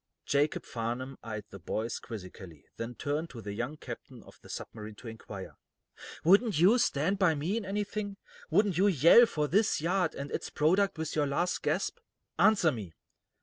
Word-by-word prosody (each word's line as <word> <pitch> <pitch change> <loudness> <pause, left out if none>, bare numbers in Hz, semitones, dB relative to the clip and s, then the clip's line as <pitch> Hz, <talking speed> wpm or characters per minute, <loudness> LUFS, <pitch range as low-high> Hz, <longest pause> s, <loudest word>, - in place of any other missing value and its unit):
Jacob 145 +2 +1
Farnum 120 +3 -4
eyed 110 -2 -5
the 100 - -9
boys 110 +6 -3
quizzically, 90 -7 -10
then 115 +1 -5
turned 150 +6 -2
to 120 - -9
the 100 -2 -6
young 120 +8 -4
captain 120 -3 -9
of - - -17
the - - -15
submarine 110 -1 -7
to 115 - -12
inquire: 105 -4 -9 0.7
"Wouldn't 200 +2 +5
you 205 +9 +6
stand 185 -1 +1
by 170 -5 +4
me 160 +8 -1
in 230 -3 -2
anything? 205 0 -3 0.3
Wouldn't 200 -5 +2
you 200 - +5
yell 185 - +7
for 150 -7 -1
this 205 +7 +2
yard 175 +1 0
and 140 +1 -6
its - - -3
product 185 +6 +2
with 160 -1 -3
your 150 -2 +2
last 175 +6 0
gasp? 180 - -1 0.4
Answer 205 -7 +5
me." 105 - -7
150 Hz, 175 wpm, -30 LUFS, 115-195 Hz, 0.7 s, yell